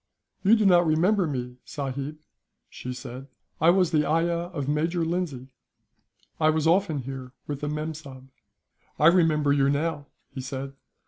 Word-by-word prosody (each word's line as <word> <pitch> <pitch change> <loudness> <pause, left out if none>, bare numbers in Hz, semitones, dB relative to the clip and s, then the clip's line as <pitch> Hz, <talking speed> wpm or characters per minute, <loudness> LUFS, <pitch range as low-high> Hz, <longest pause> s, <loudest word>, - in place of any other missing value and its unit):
"You 205 +3 +6
do 215 -2 +1
not 175 -3 +5
remember 180 +4 +3
me, 125 -3 -4
sahib?" 140 +1 -5 0.5
she 125 - -6
said. 130 +1 -8 0.3
"I 165 - +6
was 180 -1 +4
the 150 -2 +3
ayah 170 +2 0
of 145 -7 -4
Major 165 +3 0
Lindsay. 155 -7 -3 0.9
I 155 -1 +4
was 155 0 +1
often 165 -5 +2
here 130 -1 -7
with 145 -1 -5
the 145 - -2
mem 155 +1 -3
sahib." 135 -4 -11 0.7
"I 150 - +2
remember 155 -5 +3
you, 140 -1 +3
now," 145 0 -1 0.3
he 130 - -5
said. 135 +1 -5
150 Hz, 155 wpm, -26 LUFS, 135-170 Hz, 0.9 s, You